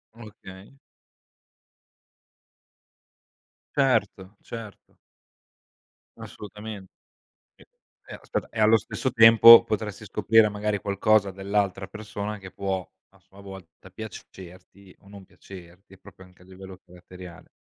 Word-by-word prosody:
Okay. 105 Hz, 0 st, -14 dB, 3.0 s
Certo, 105 Hz, -7 st, -1 dB
certo. 115 Hz, -3 st, -12 dB, 1.2 s
Assolutamente. 105 Hz, -1 st, -11 dB, 0.6 s
E -, -, -21 dB, 0.4 s
e -, -, -10 dB
aspetta, -, -, -6 dB
e, 115 Hz, -, -7 dB
allo 110 Hz, +1 st, +4 dB
stesso 130 Hz, +3 st, -5 dB
tempo, 115 Hz, 0 st, +8 dB
potresti 105 Hz, -2 st, -5 dB
scoprire, 110 Hz, 0 st, +2 dB
magari, 105 Hz, 0 st, -3 dB
qualcosa 100 Hz, 0 st, 0 dB
dell'altra 95 Hz, 0 st, -3 dB
persona 105 Hz, 0 st, -7 dB
che 95 Hz, -2 st, -13 dB
può, 95 Hz, -2 st, -4 dB, 0.2 s
a -, -, -27 dB
sua 100 Hz, +1 st, -19 dB
volta, 95 Hz, -2 st, -14 dB
piacerti 95 Hz, -2 st, -13 dB
o 100 Hz, -, -23 dB
non 100 Hz, -1 st, -14 dB
piacerti 95 Hz, +1 st, -16 dB
proprio, 95 Hz, -1 st, -17 dB
anche 90 Hz, 0 st, -22 dB
a -, -, -21 dB
livello 95 Hz, 0 st, -13 dB
caratteriale 90 Hz, -1 st, -14 dB
100 Hz, 105 wpm, -24 LUFS, 95-105 Hz, 3.0 s, tempo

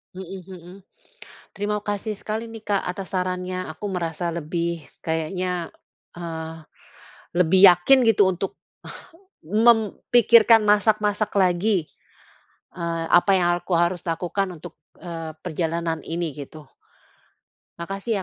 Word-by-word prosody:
Mhm 190 Hz, +1 st, -7 dB
mhm. 180 Hz, -1 st, -11 dB, 0.8 s
Terima 205 Hz, +1 st, -2 dB
kasih 205 Hz, +1 st, -3 dB
sekali 220 Hz, +3 st, -5 dB
nih, 225 Hz, -1 st, -10 dB
Kak, 205 Hz, -2 st, +1 dB
atas 185 Hz, +1 st, -5 dB
sarannya, 185 Hz, 0 st, -2 dB
aku 160 Hz, +6 st, -8 dB
merasa 170 Hz, -1 st, -3 dB
lebih 170 Hz, 0 st, -3 dB, 0.2 s
kayaknya, 170 Hz, +2 st, -2 dB, 0.5 s
eee, 165 Hz, -2 st, -6 dB, 0.8 s
lebih 180 Hz, +1 st, +4 dB
yakin 180 Hz, +10 st, +5 dB
gitu 205 Hz, -2 st, +5 dB
untuk 185 Hz, +2 st, -5 dB, 0.9 s
mem 220 Hz, +4 st, +3 dB, 0.2 s
pikirkan 230 Hz, -2 st, +6 dB
masak-masak 210 Hz, 0 st, +2 dB
lagi, 185 Hz, -1 st, +2 dB, 0.9 s
eee, 170 Hz, -1 st, -2 dB
apa 175 Hz, +3 st, +5 dB
yang 180 Hz, -2 st, +3 dB
alku 175 Hz, +1 st, -5 dB
harus 175 Hz, +1 st, +1 dB
lakukan 180 Hz, +3 st, -2 dB
untuk, 165 Hz, +1 st, -11 dB, 0.2 s
eee, 165 Hz, -3 st, -6 dB
perjalanan 165 Hz, 0 st, -2 dB
ini, 170 Hz, 0 st, -2 dB
gitu. 145 Hz, +2 st, -10 dB, 1.1 s
Makasih 195 Hz, +4 st, -3 dB
180 Hz, 110 wpm, -23 LUFS, 170-205 Hz, 1.1 s, pikirkan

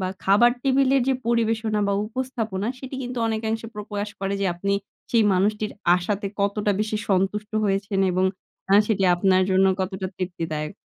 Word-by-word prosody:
বা 185 Hz, -, -1 dB, 0.2 s
খাবার 205 Hz, +5 st, +5 dB
টেবিলের 270 Hz, -1 st, +3 dB
যে 265 Hz, -, +3 dB
পরিবেশনা 225 Hz, -2 st, +1 dB
বা -, -, +1 dB
উপস্থাপনা, 225 Hz, -4 st, -3 dB
সেটি 265 Hz, +1 st, -8 dB
কিন্তু 250 Hz, 0 st, -5 dB
অনেকাংশে 225 Hz, 0 st, -2 dB
প্র 210 Hz, -, -5 dB
প্রকাস 205 Hz, 0 st, -3 dB
করে 195 Hz, 0 st, -1 dB
যে, 200 Hz, -, +1 dB
আপনি 200 Hz, +3 st, -2 dB, 0.4 s
সেই 230 Hz, -2 st, +4 dB
মানুষটির 210 Hz, +3 st, 0 dB, 0.2 s
আশাতে, 200 Hz, +3 st, -2 dB
কতটা 205 Hz, +1 st, +1 dB
বেশি 215 Hz, 0 st, -1 dB
সন্তুষ্ট 205 Hz, +2 st, 0 dB
হয়েছেন 195 Hz, 0 st, 0 dB
এবং 185 Hz, +1 st, +1 dB, 0.5 s
আ -, -, +7 dB
সেটি 210 Hz, -3 st, 0 dB
আপনার 185 Hz, +1 st, +3 dB
জন্য 190 Hz, +1 st, +4 dB
কতটা 190 Hz, 0 st, -3 dB
তৃপ্তিদায়ক। 165 Hz, -4 st, -4 dB
205 Hz, 160 wpm, -24 LUFS, 190-225 Hz, 0.5 s, আ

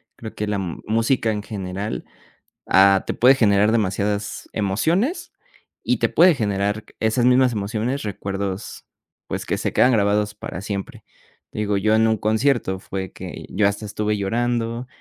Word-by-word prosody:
Creo 110 Hz, -2 st, -9 dB
que 105 Hz, -, -2 dB
la 105 Hz, -1 st, -1 dB
música 110 Hz, +6 st, 0 dB
en 105 Hz, -1 st, -3 dB
general, 100 Hz, 0 st, -5 dB, 0.6 s
ah, 95 Hz, 0 st, +5 dB
te -, -, -2 dB
puede 125 Hz, +4 st, +6 dB
generar 105 Hz, -3 st, +3 dB
demasiadas 100 Hz, -1 st, -1 dB
emociones 170 Hz, -, 0 dB, 0.5 s
y -, -, +1 dB
te -, -, +1 dB
puede 175 Hz, 0 st, +6 dB
generar 105 Hz, -3 st, -1 dB, 0.2 s
esas 110 Hz, +2 st, +1 dB
mismas 125 Hz, 0 st, +4 dB
emociones, 110 Hz, +6 st, -2 dB
recuerdos, 100 Hz, -1 st, -5 dB, 0.4 s
pues, -, -, -4 dB
que -, -, 0 dB
se -, -, -2 dB
quedan 130 Hz, -, +4 dB
grabados 105 Hz, -1 st, +1 dB
para 90 Hz, -4 st, -7 dB
siempre. 100 Hz, -1 st, -6 dB, 0.5 s
Digo, 105 Hz, -1 st, -1 dB
yo 110 Hz, +2 st, +2 dB
en 110 Hz, 0 st, +4 dB
un 110 Hz, -1 st, +1 dB
concierto 110 Hz, -2 st, +1 dB
fue 95 Hz, -1 st, -5 dB
que -, -, -8 dB
yo 100 Hz, +1 st, +1 dB
hasta 100 Hz, +2 st, -1 dB
estuve 105 Hz, 0 st, -2 dB
llorando 115 Hz, +3 st, -1 dB
105 Hz, 150 wpm, -22 LUFS, 100-115 Hz, 0.6 s, puede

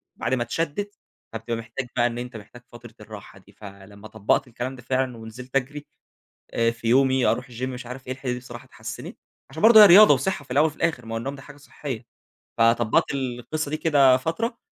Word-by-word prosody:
وبعد 125 Hz, -, -3 dB
ما 125 Hz, -2 st, +1 dB
اتشدِّت، 165 Hz, -, -3 dB, 0.4 s
فبتبقى 115 Hz, +1 st, -4 dB
محتاج 115 Hz, +3 st, -6 dB
بقى 120 Hz, -1 st, +3 dB
إن 120 Hz, 0 st, -5 dB
أنت 125 Hz, -1 st, -6 dB
محتاج 115 Hz, +4 st, -14 dB
فترة 120 Hz, -1 st, -14 dB
الراحة 105 Hz, -3 st, -12 dB
دي. 100 Hz, +1 st, -21 dB
فلمّا 100 Hz, +1 st, -13 dB
طبقت 110 Hz, +6 st, 0 dB
الكلام 125 Hz, +2 st, -5 dB
ده 125 Hz, -, -13 dB
فعلًا 130 Hz, 0 st, -2 dB
ونزلت 120 Hz, +4 st, -11 dB
أجري، 145 Hz, +2 st, -2 dB, 0.7 s
آآ، 115 Hz, 0 st, +1 dB
في 115 Hz, 0 st, -6 dB
يومي 130 Hz, +1 st, +3 dB
أروح 125 Hz, +2 st, 0 dB
الgym 120 Hz, +1 st, -9 dB
مش 125 Hz, -1 st, -5 dB
عارف 125 Hz, +1 st, -9 dB
إيه، 130 Hz, -, -3 dB
الحتة 130 Hz, -1 st, -5 dB
دي 125 Hz, -, -4 dB
الصراحة 120 Hz, -1 st, -11 dB
اتحسنت، -, -, -9 dB, 0.3 s
عشان 160 Hz, -, -8 dB
برضه 220 Hz, -1 st, +9 dB
هي 210 Hz, -, +11 dB
رياضة 195 Hz, -2 st, +8 dB
وصحة 145 Hz, +3 st, -2 dB
في 130 Hz, -, -26 dB
الأول 145 Hz, +5 st, +4 dB
وفي 155 Hz, -1 st, -6 dB
الآخر، 140 Hz, -9 st, -2 dB
ما 115 Hz, -, -5 dB
هو -, -, -1 dB
النوم 135 Hz, +5 st, -5 dB
ده 135 Hz, -, -11 dB
حاجة 145 Hz, +1 st, -14 dB
صحية. 140 Hz, -4 st, -8 dB, 0.5 s
فطبقت 115 Hz, -1 st, +3 dB
القصة 135 Hz, +3 st, -4 dB
دي 155 Hz, -, -1 dB
كده 140 Hz, -5 st, +4 dB
فترة، 220 Hz, -, -3 dB
125 Hz, 210 wpm, -24 LUFS, 115-140 Hz, 0.7 s, هي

